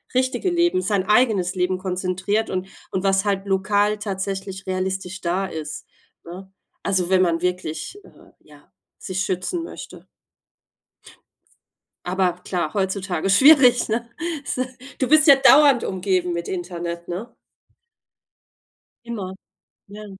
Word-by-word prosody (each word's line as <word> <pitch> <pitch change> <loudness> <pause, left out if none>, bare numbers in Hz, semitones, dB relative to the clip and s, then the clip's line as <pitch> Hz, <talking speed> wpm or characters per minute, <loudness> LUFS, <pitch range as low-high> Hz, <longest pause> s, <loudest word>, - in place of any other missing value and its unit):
richtige 260 +8 +1
Leben, 345 +1 +2
sein 200 -3 0
eigenes 210 -6 +3
Leben 185 0 0
konzentriert 185 +3 -2
und 185 0 -3 0.2
und 190 - -2
was 195 0 +2
halt 200 -1 -1
lokal 205 +2 +1
tatsächlich 195 -1 -4
realistisch 190 0 -3
da 180 +3 -1
ist, 155 -3 -7 0.4
ne? 185 +3 -10 0.3
Also 185 -3 0
wenn 190 -1 +4
man 170 -2 +1
wirklich, 180 - -3
äh, - - -19
ja, 150 +2 -20 0.3
sich 185 0 -3
schützen 190 - -2
möchte. - - -10 2.0
Aber 185 0 +1
klar, 175 -4 -2
heutzutage 190 -2 -1
schwierig, 255 0 +6
ne, 230 +2 -1 0.4
so 255 - -1 0.4
Du 260 - +1
bist 310 +3 +5
ja 280 -3 +9
dauernd 280 -2 +6
umgeben 185 -2 -1
mit 170 0 -4
Internet, 170 -1 -5
ne? 205 +7 -6 1.7
Immer, 205 -6 -5 0.5
ja. 210 +1 -10
190 Hz, 120 wpm, -22 LUFS, 180-215 Hz, 2.0 s, ja